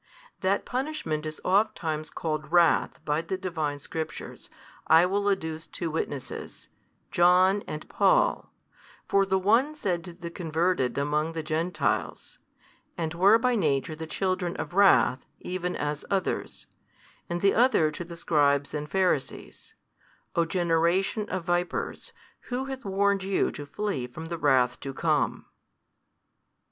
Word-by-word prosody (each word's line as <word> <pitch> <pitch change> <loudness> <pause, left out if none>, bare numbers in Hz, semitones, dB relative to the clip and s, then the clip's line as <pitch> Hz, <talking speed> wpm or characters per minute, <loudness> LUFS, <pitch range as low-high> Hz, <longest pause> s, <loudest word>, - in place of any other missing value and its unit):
That 190 +2 0
punishment 250 - -3
is 155 - -7
ofttimes 175 -6 +1
called 155 -2 -4
wrath 175 -1 +3
by 150 +1 +1
the 190 +3 -4
Divine 160 -6 -3
Scriptures, 160 +3 -7 0.4
I 165 +2 +7
will 200 +2 +1
adduce 160 -4 -2
two 170 -3 -4
witnesses, 145 -4 -5 0.5
Paul 185 +3 +5
and 150 - -6
John: - - +3 0.6
for 195 0 +3
the 190 0 +2
one 230 +10 +2
said 180 - -2
to 175 - -9
the 170 -1 -8
converted 165 -6 0
among 150 +3 0
the 160 -1 -4
Gentiles, 160 +3 -2 0.6
And 165 -2 -2
were 195 +6 +6
by 250 +2 +1
nature 155 - 0
the 160 +1 -7
children 185 0 -1
of - - -5
wrath, 185 -9 +4 0.2
even 180 0 -3
as 150 0 -3
others; 195 -1 -2 0.6
and 175 0 -2
the 200 - +4
other 225 -11 +4
to 150 - -6
the 170 0 -10
Scribes 145 -3 +2
and 150 0 -4
Pharisees, 185 -8 -2 0.6
O 170 - +3
generation 175 +4 +1
of 185 -2 -3
vipers, 175 0 -2 0.4
who 255 +1 -2
hath 265 0 -6
warned 200 0 +1
you 190 0 0
to 145 - -8
flee 145 -7 -3
from 160 +6 -9
the 170 -1 -4
wrath 130 -4 +3
to 135 -1 -6
come? - - 0
170 Hz, 140 wpm, -27 LUFS, 155-195 Hz, 0.6 s, I